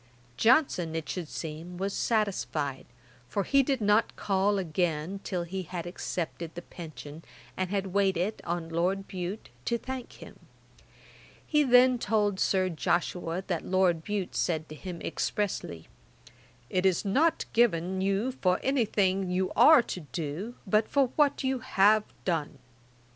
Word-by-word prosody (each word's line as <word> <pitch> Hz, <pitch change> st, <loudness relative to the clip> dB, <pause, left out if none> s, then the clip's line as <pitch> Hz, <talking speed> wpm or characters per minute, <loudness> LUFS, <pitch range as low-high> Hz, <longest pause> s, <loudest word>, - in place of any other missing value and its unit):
Johnson, 205 Hz, -, +3 dB
it 160 Hz, -2 st, -3 dB
should 180 Hz, -4 st, -4 dB
seem, 165 Hz, +3 st, -7 dB
was 195 Hz, +2 st, -2 dB
satisfied, 185 Hz, -, -1 dB, 0.4 s
for 200 Hz, -, 0 dB
he 275 Hz, +7 st, +4 dB
did 270 Hz, -2 st, -1 dB
not 210 Hz, +2 st, +3 dB
call 200 Hz, +1 st, +1 dB
again 175 Hz, 0 st, -1 dB
till 180 Hz, -3 st, -2 dB
he 190 Hz, +3 st, -4 dB
had 175 Hz, -1 st, -6 dB
accepted 170 Hz, -2 st, -4 dB
the 175 Hz, -, -7 dB
pension, 155 Hz, -2 st, -10 dB, 0.3 s
and 185 Hz, -1 st, -2 dB
had 195 Hz, -2 st, -2 dB
waited 195 Hz, +1 st, +1 dB
on 170 Hz, -1 st, -3 dB
Lord 185 Hz, +4 st, 0 dB
Bute 185 Hz, +3 st, -5 dB, 0.2 s
to 235 Hz, -, +1 dB
thank 260 Hz, +1 st, -6 dB
him. -, -, -13 dB, 1.1 s
He 300 Hz, -1 st, +3 dB
then 250 Hz, -1 st, +5 dB
told 205 Hz, -3 st, +1 dB
Sir 185 Hz, -1 st, +2 dB
Joshua 175 Hz, +1 st, -1 dB
that 175 Hz, -4 st, -2 dB
Lord 180 Hz, -3 st, +2 dB
Bute 205 Hz, -2 st, -3 dB
said 160 Hz, -2 st, 0 dB
to 155 Hz, -, -8 dB
him 175 Hz, +1 st, -7 dB
expressly, 180 Hz, -, -3 dB, 0.8 s
'It 185 Hz, -, +1 dB
is 190 Hz, +1 st, +2 dB
not 310 Hz, +11 st, +2 dB
given 190 Hz, -5 st, +2 dB
you 195 Hz, +6 st, +1 dB
for 185 Hz, -8 st, +1 dB
anything 200 Hz, -8 st, +1 dB
you 185 Hz, +1 st, 0 dB
are 250 Hz, +3 st, +8 dB
to 185 Hz, -, -5 dB
do, 165 Hz, -, -5 dB
but 215 Hz, +2 st, +2 dB
for 275 Hz, -3 st, +2 dB
what 290 Hz, -2 st, +2 dB
you 265 Hz, -1 st, 0 dB
have 215 Hz, -4 st, +3 dB, 0.2 s
done.' 160 Hz, -5 st, -1 dB
190 Hz, 145 wpm, -29 LUFS, 170-215 Hz, 1.1 s, are